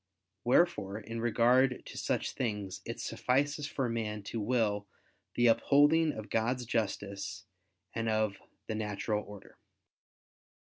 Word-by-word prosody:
Wherefore 120 Hz, -, +2 dB
in 115 Hz, +1 st, -5 dB
regard 125 Hz, +2 st, +3 dB
to -, -, -10 dB
such -, -, -1 dB
things 105 Hz, -5 st, -3 dB
it 115 Hz, -, -5 dB
suffices 145 Hz, +3 st, 0 dB
for 135 Hz, -4 st, -1 dB
man 110 Hz, -3 st, -3 dB
to 110 Hz, +3 st, -4 dB
will 105 Hz, -3 st, +1 dB, 0.5 s
the 120 Hz, -, +3 dB
upholding 145 Hz, +7 st, +5 dB
of 110 Hz, -1 st, -8 dB
God's 120 Hz, +3 st, 0 dB
justice 100 Hz, -4 st, -3 dB, 0.5 s
and 115 Hz, 0 st, -1 dB
of 110 Hz, -2 st, +1 dB, 0.3 s
the 110 Hz, -, -3 dB
natural 105 Hz, 0 st, -2 dB
order. 105 Hz, -1 st, -13 dB
115 Hz, 125 wpm, -32 LUFS, 105-125 Hz, 0.5 s, upholding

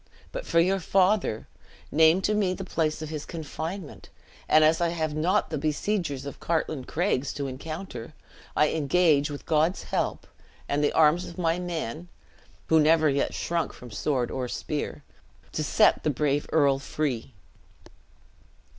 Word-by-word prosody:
But -, -, -6 dB
for 170 Hz, -, +3 dB
your 190 Hz, +3 st, +3 dB
father; 185 Hz, -, +1 dB, 0.4 s
name 160 Hz, +4 st, +5 dB
to 210 Hz, -, +2 dB
me 195 Hz, -3 st, +1 dB
the 195 Hz, -, -6 dB
place 160 Hz, -4 st, -1 dB
of 155 Hz, -, -6 dB
his 155 Hz, -2 st, -5 dB
confinement, 165 Hz, +1 st, -6 dB, 0.4 s
and 155 Hz, -, +6 dB
as 160 Hz, +2 st, +4 dB
I 170 Hz, -, +2 dB
have 160 Hz, -2 st, -2 dB
not 175 Hz, +7 st, +1 dB
the 155 Hz, -, -2 dB
besiegers 155 Hz, -2 st, -1 dB
of 140 Hz, -, -7 dB
Cartlane 155 Hz, -5 st, -1 dB
Craigs 150 Hz, -5 st, 0 dB
to 140 Hz, -, -4 dB
encounter. 155 Hz, 0 st, -7 dB, 0.4 s
I 150 Hz, -, +4 dB
engage, 155 Hz, -1 st, +2 dB
with 145 Hz, -1 st, -7 dB
God's 160 Hz, +3 st, +1 dB
help, -, -, -2 dB, 0.4 s
and 145 Hz, +1 st, 0 dB
the 145 Hz, -, +3 dB
arms 160 Hz, +3 st, +4 dB
of 170 Hz, -, -10 dB
my 170 Hz, -1 st, +1 dB
men 170 Hz, -2 st, -4 dB, 0.6 s
(who 160 Hz, -, +4 dB
never 155 Hz, 0 st, +4 dB
yet 140 Hz, 0 st, 0 dB
shrunk 170 Hz, -3 st, -1 dB
from 125 Hz, -2 st, -12 dB
sword 125 Hz, +2 st, -1 dB
or 130 Hz, -1 st, -3 dB
spear), 150 Hz, +3 st, -4 dB, 0.5 s
to 155 Hz, -, -2 dB
set 210 Hz, +8 st, +4 dB
the -, -, +1 dB
brave 145 Hz, 0 st, 0 dB
earl 140 Hz, -4 st, +3 dB
free!" 135 Hz, -4 st, -3 dB
155 Hz, 155 wpm, -27 LUFS, 145-175 Hz, 0.6 s, and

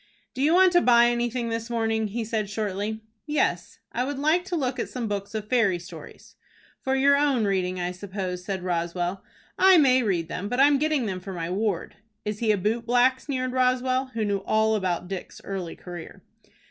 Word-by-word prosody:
"Do 255 Hz, -, -4 dB
you 310 Hz, +5 st, +4 dB
want 370 Hz, 0 st, +6 dB
to 350 Hz, 0 st, +5 dB
buy 240 Hz, -1 st, +5 dB
anything 240 Hz, 0 st, -1 dB
this 230 Hz, 0 st, -3 dB
morning?" 225 Hz, -2 st, 0 dB
he 225 Hz, +3 st, -4 dB
said, 215 Hz, -2 st, -2 dB
shortly. 210 Hz, +1 st, -3 dB, 0.3 s
"Yes; 195 Hz, -, -1 dB
I 245 Hz, -, -1 dB
would 280 Hz, +1 st, -3 dB
like 310 Hz, +5 st, +2 dB
to 375 Hz, -2 st, -3 dB
look 260 Hz, -5 st, -1 dB
at -, -, -2 dB
some 245 Hz, -3 st, -4 dB
books 205 Hz, +1 st, -4 dB
of 215 Hz, -1 st, -4 dB
fairy 215 Hz, -7 st, +2 dB
stories." 175 Hz, +1 st, -12 dB, 0.5 s
"For 265 Hz, 0 st, 0 dB
your 280 Hz, +1 st, +5 dB
own 280 Hz, -6 st, +2 dB
reading, 185 Hz, -2 st, 0 dB
I 175 Hz, 0 st, -2 dB
suppose," 185 Hz, -1 st, -5 dB
said 190 Hz, -1 st, -4 dB
Roswell. 175 Hz, +1 st, -2 dB, 0.4 s
"I 380 Hz, -1 st, +7 dB
may 260 Hz, -4 st, +5 dB
read 180 Hz, -8 st, 0 dB
them, 190 Hz, +4 st, -4 dB
but 245 Hz, -, -1 dB
I 275 Hz, -, +8 dB
am 285 Hz, -1 st, +4 dB
getting 305 Hz, -4 st, +1 dB
them 190 Hz, -3 st, -3 dB
for 190 Hz, +1 st, -8 dB
my 170 Hz, -1 st, -4 dB
ward." 195 Hz, -2 st, -2 dB, 0.3 s
"Is 210 Hz, 0 st, -3 dB
he 225 Hz, -2 st, +2 dB
a 210 Hz, -, +2 dB
boot 225 Hz, +5 st, -1 dB
black?" 250 Hz, +2 st, +3 dB
sneered 255 Hz, -3 st, -3 dB
Roswell, 255 Hz, +1 st, +1 dB
who 220 Hz, -2 st, 0 dB
knew 200 Hz, -1 st, 0 dB
all 220 Hz, +2 st, +1 dB
about 185 Hz, -4 st, -1 dB
Dick's 190 Hz, -1 st, -7 dB
early 190 Hz, -4 st, -5 dB
career. 175 Hz, -2 st, -10 dB
220 Hz, 205 wpm, -25 LUFS, 190-255 Hz, 0.5 s, I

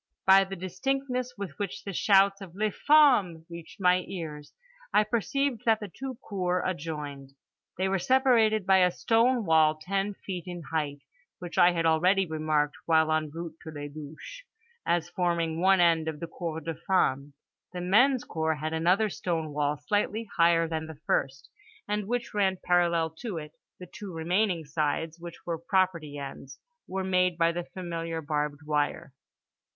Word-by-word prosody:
By 195 Hz, 0 st, +7 dB
the 195 Hz, 0 st, -6 dB
distinctness 250 Hz, +7 st, -3 dB
with 195 Hz, -8 st, -7 dB
which 200 Hz, -3 st, -4 dB
the 200 Hz, -, -5 dB
shouts 195 Hz, +1 st, +4 dB
of 185 Hz, -3 st, -10 dB
les 215 Hz, +1 st, 0 dB
femmes 230 Hz, -, +4 dB
reached 170 Hz, +2 st, -10 dB
my 180 Hz, -1 st, +3 dB
ears 150 Hz, -5 st, -7 dB, 0.4 s
I 210 Hz, -, +4 dB
perceived 235 Hz, +4 st, -1 dB
that 225 Hz, -2 st, +4 dB
the 210 Hz, -4 st, -7 dB
two 265 Hz, -1 st, -5 dB
cours 180 Hz, -3 st, -1 dB
adjoined. 150 Hz, -5 st, -5 dB, 0.4 s
They 190 Hz, +1 st, +1 dB
were 190 Hz, 0 st, 0 dB
separated 230 Hz, -4 st, +3 dB
by 190 Hz, 0 st, +5 dB
a 180 Hz, -1 st, +5 dB
stone 230 Hz, +5 st, +2 dB
wall 160 Hz, -2 st, +4 dB
ten 195 Hz, +4 st, -2 dB
feet 185 Hz, -3 st, -6 dB
in 175 Hz, -1 st, -6 dB
height, 145 Hz, -3 st, -2 dB, 0.4 s
which 175 Hz, -1 st, -5 dB
I 175 Hz, 0 st, +6 dB
had 165 Hz, -1 st, -1 dB
already 180 Hz, +5 st, +3 dB
remarked 155 Hz, -2 st, -1 dB
(while 160 Hz, -1 st, +4 dB
en 155 Hz, -1 st, 0 dB
route 165 Hz, +1 st, -7 dB
to -, -, -9 dB
les 145 Hz, -1 st, -7 dB
douches) 155 Hz, -, -10 dB, 0.5 s
as 170 Hz, -1 st, +1 dB
forming 170 Hz, -2 st, -1 dB
one 190 Hz, 0 st, +5 dB
end 165 Hz, -2 st, +3 dB
of 155 Hz, -2 st, -4 dB
the 170 Hz, -, -4 dB
cour 165 Hz, -1 st, -5 dB
des 165 Hz, 0 st, -5 dB
femmes. 140 Hz, -6 st, +1 dB, 0.4 s
The 180 Hz, -, -6 dB
men's 245 Hz, +8 st, +4 dB
cour 160 Hz, -1 st, -1 dB
had 155 Hz, +1 st, -4 dB
another 180 Hz, +7 st, +2 dB
stone 160 Hz, -5 st, -3 dB
wall 145 Hz, 0 st, 0 dB
slightly 205 Hz, +8 st, -1 dB
higher 170 Hz, -1 st, +4 dB
than 160 Hz, -1 st, -3 dB
the 160 Hz, -2 st, -10 dB
first, 135 Hz, 0 st, -1 dB, 0.4 s
and 210 Hz, -1 st, -2 dB
which 240 Hz, +1 st, -2 dB
ran 195 Hz, -2 st, +1 dB
parallel 170 Hz, -2 st, +2 dB
to 220 Hz, -8 st, -4 dB
it; 150 Hz, -1 st, -7 dB, 0.3 s
the 180 Hz, -, -8 dB
two 195 Hz, +2 st, -9 dB
remaining 175 Hz, +1 st, 0 dB
sides, 155 Hz, +2 st, -2 dB
which 170 Hz, 0 st, -10 dB
were 170 Hz, -2 st, -3 dB
property 170 Hz, -4 st, 0 dB
ends, 135 Hz, -1 st, -8 dB, 0.3 s
were 190 Hz, 0 st, -3 dB
made 180 Hz, -2 st, +1 dB
by 165 Hz, 0 st, +3 dB
the 175 Hz, 0 st, -4 dB
familiar 165 Hz, -3 st, -5 dB
barbed 150 Hz, -1 st, -2 dB
wire. 150 Hz, -2 st, -1 dB
175 Hz, 170 wpm, -28 LUFS, 160-195 Hz, 0.5 s, By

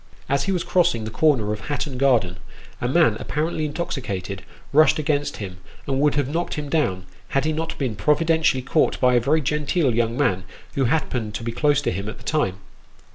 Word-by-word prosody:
As 140 Hz, 0 st, +1 dB
he 195 Hz, -, 0 dB
was 180 Hz, -3 st, 0 dB
crossing 175 Hz, -10 st, +2 dB
the 110 Hz, -, -5 dB
corner 115 Hz, -6 st, +2 dB
of 105 Hz, -, -5 dB
Hatton 145 Hz, -3 st, -3 dB
Garden, 115 Hz, -10 st, +2 dB, 0.4 s
a 120 Hz, -, 0 dB
man 135 Hz, -5 st, +3 dB
apparently 155 Hz, +1 st, -2 dB
intoxicated, 125 Hz, -, -4 dB, 0.3 s
rushed 155 Hz, +2 st, +5 dB
against 145 Hz, -1 st, -1 dB
him, 95 Hz, -3 st, -7 dB, 0.3 s
and 135 Hz, -1 st, -1 dB
would 145 Hz, -1 st, +3 dB
have 145 Hz, -3 st, +1 dB
knocked 165 Hz, +5 st, -2 dB
him 150 Hz, -1 st, -4 dB
down, 95 Hz, -, 0 dB, 0.2 s
had 135 Hz, +1 st, 0 dB
he 155 Hz, -, +1 dB
not 160 Hz, +1 st, -3 dB
been 130 Hz, -6 st, -2 dB
provi 150 Hz, +11 st, +2 dB
dentially 160 Hz, -6 st, +2 dB
caught 150 Hz, +3 st, +2 dB
by 125 Hz, -1 st, +4 dB
a 120 Hz, -, +5 dB
very 145 Hz, +6 st, +2 dB
genteel 150 Hz, 0 st, +1 dB
young 115 Hz, +1 st, 0 dB
man, 95 Hz, -10 st, +1 dB, 0.3 s
who 135 Hz, -, +1 dB
happened 125 Hz, -6 st, -1 dB
to -, -, -4 dB
be 115 Hz, -, -2 dB
close 145 Hz, +4 st, +2 dB
to -, -, 0 dB
him 100 Hz, +4 st, -4 dB
at 110 Hz, -, -8 dB
the -, -, -15 dB
time. 150 Hz, -12 st, 0 dB
140 Hz, 205 wpm, -23 LUFS, 115-155 Hz, 0.4 s, rushed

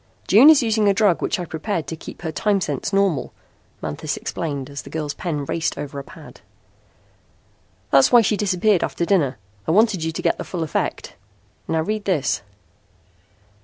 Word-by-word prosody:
"June 235 Hz, +10 st, +8 dB
is 300 Hz, -5 st, +6 dB
using 220 Hz, -2 st, +2 dB
a 200 Hz, -, +3 dB
drug 200 Hz, -5 st, +3 dB
which 210 Hz, -, -1 dB
I 175 Hz, -, -3 dB
prepared 165 Hz, +1 st, -3 dB
to 160 Hz, -, -5 dB
keep 160 Hz, -, -11 dB
her 160 Hz, -, -2 dB
time 205 Hz, +5 st, +1 dB
sense 145 Hz, -4 st, -3 dB
normal," 195 Hz, -8 st, +1 dB, 0.5 s
Manthis 145 Hz, -, -3 dB
explained 140 Hz, -5 st, -4 dB
as 140 Hz, 0 st, -7 dB
the -, -, -12 dB
girl's 150 Hz, -2 st, -3 dB
pen 150 Hz, -3 st, -3 dB
raced 165 Hz, +3 st, -2 dB
over 140 Hz, -1 st, -5 dB
a -, -, -7 dB
pad. -, -, -14 dB, 1.5 s
"That's 135 Hz, -1 st, +5 dB
why 240 Hz, -, +8 dB
she 210 Hz, 0 st, +1 dB
disappeared 200 Hz, -1 st, +2 dB
after 170 Hz, -, -2 dB
dinner. 150 Hz, -10 st, +1 dB, 0.3 s
I -, -, +2 dB
wanted 205 Hz, -2 st, +3 dB
you 160 Hz, -, -1 dB
to 160 Hz, -, -5 dB
get -, -, +1 dB
the -, -, -3 dB
full 175 Hz, -3 st, -4 dB
effect. 155 Hz, -, -3 dB, 0.5 s
Now 160 Hz, -1 st, 0 dB
read 215 Hz, +3 st, -3 dB
this." 155 Hz, -9 st, 0 dB
170 Hz, 180 wpm, -21 LUFS, 150-205 Hz, 1.5 s, June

